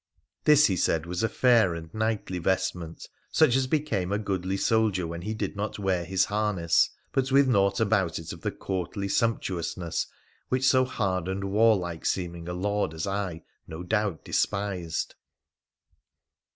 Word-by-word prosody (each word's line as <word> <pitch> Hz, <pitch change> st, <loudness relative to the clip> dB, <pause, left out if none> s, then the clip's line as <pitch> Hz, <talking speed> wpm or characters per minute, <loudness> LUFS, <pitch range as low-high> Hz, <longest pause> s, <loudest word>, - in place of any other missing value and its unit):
This, 150 Hz, 0 st, +7 dB
he 95 Hz, -, +2 dB
said, 80 Hz, -2 st, +1 dB
was 90 Hz, +3 st, -3 dB
a 115 Hz, -, +1 dB
fair 115 Hz, -7 st, +4 dB
and 80 Hz, -1 st, -9 dB
knightly 110 Hz, -4 st, -1 dB
vestment 85 Hz, -2 st, -2 dB, 0.2 s
such 120 Hz, -, +4 dB
as 130 Hz, -1 st, +2 dB
became 115 Hz, -, -1 dB
a 100 Hz, -, +1 dB
goodly 95 Hz, -2 st, -2 dB
soldier 105 Hz, -4 st, +2 dB
when 85 Hz, +1 st, -5 dB
he 110 Hz, +4 st, -3 dB
did 100 Hz, -2 st, -3 dB
not 105 Hz, +2 st, -3 dB
wear 95 Hz, -4 st, 0 dB
hii 95 Hz, 0 st, +2 dB
harness, 100 Hz, -6 st, +2 dB, 0.2 s
but 135 Hz, 0 st, 0 dB
with 135 Hz, 0 st, +5 dB
naught 100 Hz, -5 st, +2 dB
about 100 Hz, -6 st, +1 dB
it 80 Hz, -, -6 dB
of -, -, -11 dB
the -, -, -1 dB
courtly 95 Hz, +1 st, -4 dB
sumptuous 95 Hz, -6 st, -1 dB
ness 85 Hz, -3 st, -2 dB, 0.4 s
which 130 Hz, +1 st, +2 dB
so 130 Hz, -1 st, +5 dB
hard 95 Hz, -8 st, -1 dB
and 95 Hz, +1 st, -3 dB
warlike 100 Hz, -6 st, +2 dB
seeming 85 Hz, -2 st, -3 dB
a -, -, -3 dB
lord 100 Hz, -2 st, -1 dB
as 80 Hz, -, -3 dB
I 95 Hz, -4 st, -3 dB, 0.2 s
no 80 Hz, +2 st, -7 dB
doub 105 Hz, -2 st, -1 dB
despised. 95 Hz, -5 st, -1 dB
95 Hz, 165 wpm, -27 LUFS, 90-110 Hz, 0.4 s, This